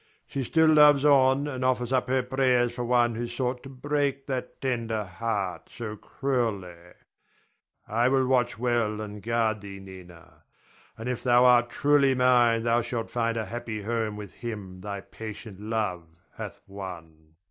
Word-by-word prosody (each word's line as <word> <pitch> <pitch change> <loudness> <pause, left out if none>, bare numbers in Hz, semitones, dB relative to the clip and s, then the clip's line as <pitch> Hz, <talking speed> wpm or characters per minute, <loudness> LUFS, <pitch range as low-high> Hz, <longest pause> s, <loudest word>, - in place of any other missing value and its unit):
She 135 - -3
still 160 +6 +3
loves 150 -2 +6
on, 140 0 +4
and 130 -3 -4
offers 125 -1 +1
up 125 0 +1
her 130 0 +2
prayers 125 -2 +2
for 120 - -4
one 120 -1 +3
who 120 +2 -3
sought 125 +1 -2
to 135 - -10
break 140 0 -1
that 130 -2 -4
tender 115 -4 -1
heart 100 -1 -3
so 110 -2 -6
cruelly. 115 -7 -2 1.1
I 115 +3 +2
will 135 0 +3
watch 125 -3 +1
well 115 -3 0
and 105 -1 -7
guard 110 -1 0
thee, 100 -1 -9
Nina; 90 -3 -13 0.6
and 115 - -6
if 125 -2 -2
thou 125 0 +5
art 120 -1 +5
truly 140 0 +3
mine 120 -3 +4
thou 115 +1 +2
shalt 115 -1 -4
find 115 -1 0
a 110 - -2
happy 110 -2 -5
home 110 -1 -2
with 105 -2 -9
him 105 -6 -7
thy 100 0 -5
patient 110 -2 -9
love 105 -6 -2 0.3
hath - - -8
won. 80 -5 -10
120 Hz, 160 wpm, -27 LUFS, 105-130 Hz, 1.1 s, loves